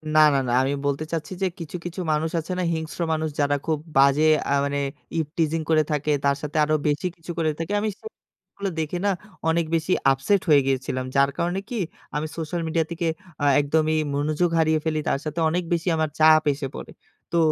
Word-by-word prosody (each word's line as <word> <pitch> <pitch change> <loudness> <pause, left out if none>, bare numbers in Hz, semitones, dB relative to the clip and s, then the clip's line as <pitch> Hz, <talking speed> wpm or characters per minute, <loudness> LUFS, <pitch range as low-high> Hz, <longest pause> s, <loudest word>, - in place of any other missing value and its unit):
না, 155 - +7
না, 140 - +3
না। - - 0
আমি 135 +1 0
বলতে 140 +2 0
চাচ্ছি 165 +2 -3
যে - - +3
কিছু, 165 +1 -7
কিছু 175 +2 -5
মানুষ 155 +1 0
আছে 165 +3 -6
না - - 0
হিংস্র 160 +2 -4
মানুষ? 160 0 -1
যারা 145 0 +2
খুব 155 -2 0 0.2
বাজে 140 +2 +5 0.3
আ - - +4
মানে 140 0 -1 0.4
ইভটিজিং 160 +1 -1
করে 155 -1 +4
থাকে, 150 0 0
তার 140 0 +3
সাথে 150 +1 -4
আরো 155 +1 +2
বেশি 145 +4 0
কিছু 170 +1 -8
করে 160 -1 +2
থাকে। 165 +5 -4
আমি 215 +1 0
সে - - -21 0.5
গুলো 200 -1 -2
দেখে 160 +3 -2
না, 205 - +4 0.4
অনেক 170 0 +2
বেশি 165 +2 -1 0.2
আপসেট 135 +9 +2
হয়ে 145 -2 +7
গিয়েছিলাম। 130 -1 -1
যার 140 0 +5
কারণে 175 +3 0
কি, 245 - -4 0.4
আমি 150 +1 -1
সোশ্যাল 165 +1 -3
মিডিয়া 160 0 +1
থেকে 170 0 -2 0.4
আ - - +3
একদমই 155 +2 +1 0.2
মনোযোগ 155 +4 +1
হারিয়ে 160 0 +3
ফেলি। 155 -1 0
তার 135 - +1
সাথে 155 +2 -3
অনেক 180 +2 0
বেশি 170 +2 -1
আমার 155 -1 0
চাপ 155 0 +7
এসে 140 0 -4
পড়ে। - - -8 0.4
তো 170 - +1
155 Hz, 205 wpm, -24 LUFS, 145-165 Hz, 0.5 s, না